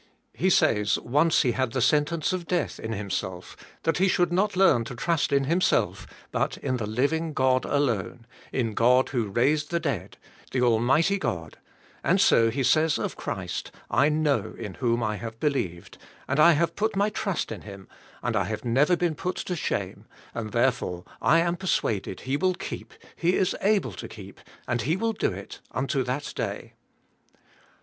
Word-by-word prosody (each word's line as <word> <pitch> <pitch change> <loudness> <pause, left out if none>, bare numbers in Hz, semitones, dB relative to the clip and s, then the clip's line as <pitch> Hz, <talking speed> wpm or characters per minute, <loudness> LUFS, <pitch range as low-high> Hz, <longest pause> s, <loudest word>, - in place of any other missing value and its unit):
He 190 - +1
says 105 - +3
once 150 +6 +2
he 125 - +2
had 130 -2 -1
the 130 - 0
sentence 150 +6 +2
of 175 -2 -4
death 175 -4 -1
in 110 - -5
himself 95 -3 -4 0.3
that 165 +1 +1
he 190 - +4
should 175 -2 +2
not 200 +3 +1
learn 185 -11 +4
to 125 - -7
trust 165 +6 0
in 140 -1 +3
himself, 170 +7 +1 0.2
but - - -1
in 130 - -2
the 110 -4 -3
living 150 +8 0
God 130 -2 +2
alone, 120 -5 -1 0.3
in 115 -4 -1
God 125 +4 +4
who 120 -6 -1
raised 145 +8 +1
the 170 - 0
dead, 140 -8 -3 0.4
the 130 - +1
Almighty 130 - +3
God, 90 - -4 0.4
and - - +3
so 115 0 +5
he 135 +4 -1
says 155 +4 +3
of - - -3
Christ, - - -5 0.2
*'I 145 - +4
know 150 -2 0
in - - -6
whom 120 -2 0
I 110 -1 -1
have 115 0 -7
believed, 100 - -2 0.3
and 140 +2 0
I 170 +2 +8
have 165 +3 0
put 220 0 0
my 205 +2 +2
trust 195 - -2
in 110 - -6
Him, 100 -2 -11 0.4
and - - -1
I - - +2
have 110 +4 -5
never 140 +9 +3
been 175 -2 0
put 180 +4 -3
to 180 - -3
shame 160 - -3 0.3
and 110 -2 -4
therefore 115 -8 0 0.2
I 165 - +5
am 170 +1 0
persuaded 110 - -1
He 135 +2 -1
will 185 +2 +1
keep. - - -7 0.2
He 175 +2 +1
is 185 - +1
able 200 - +2
to - - -7
keep, - - -11 0.3
and 120 -1 0
He 150 +9 +1
will 225 +4 0
do - - 0
it, - - -8
unto 135 +2 0
that 130 +4 -3
day." - - -4
140 Hz, 185 wpm, -26 LUFS, 115-170 Hz, 0.4 s, I